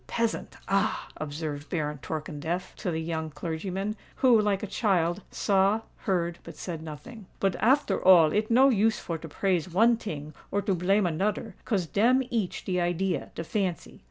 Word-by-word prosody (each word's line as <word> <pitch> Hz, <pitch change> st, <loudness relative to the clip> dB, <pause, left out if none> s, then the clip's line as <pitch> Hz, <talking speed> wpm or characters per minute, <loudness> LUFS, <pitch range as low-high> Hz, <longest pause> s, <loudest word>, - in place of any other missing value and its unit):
Peasant—ah!" 220 Hz, -3 st, -1 dB
observed 150 Hz, -1 st, -5 dB
Baron 150 Hz, -4 st, -2 dB
Torkemdef 160 Hz, +4 st, -4 dB
to -, -, -3 dB
the 160 Hz, -1 st, -1 dB
young 160 Hz, -1 st, -3 dB
clergyman, 185 Hz, +6 st, -3 dB, 0.2 s
who, 245 Hz, -5 st, +5 dB
like 205 Hz, -1 st, 0 dB
a -, -, 0 dB
child, 185 Hz, -4 st, +1 dB
saw, 200 Hz, +2 st, +2 dB
heard, 175 Hz, -4 st, -1 dB
but -, -, -10 dB
said 165 Hz, -4 st, -5 dB
nothing. 190 Hz, +8 st, -9 dB
"But 195 Hz, -2 st, +1 dB
after 235 Hz, -3 st, +2 dB
all 170 Hz, -5 st, +7 dB
it 215 Hz, +1 st, +1 dB
no 260 Hz, +4 st, +6 dB
use 220 Hz, -2 st, +3 dB
for 165 Hz, -2 st, -4 dB
to 160 Hz, -, -8 dB
praise 180 Hz, +1 st, 0 dB
one 225 Hz, +7 st, +4 dB
ting 155 Hz, -8 st, -6 dB, 0.2 s
or 200 Hz, 0 st, -1 dB
to 200 Hz, 0 st, +1 dB
blame 190 Hz, +3 st, +2 dB
anoder—'cause 195 Hz, +2 st, -1 dB
dem 240 Hz, +10 st, +3 dB
each 220 Hz, -6 st, -2 dB
de 180 Hz, -1 st, 0 dB
idea—de 175 Hz, -1 st, -1 dB
fancy. 185 Hz, -1 st, -3 dB
185 Hz, 155 wpm, -28 LUFS, 165-210 Hz, 0.2 s, all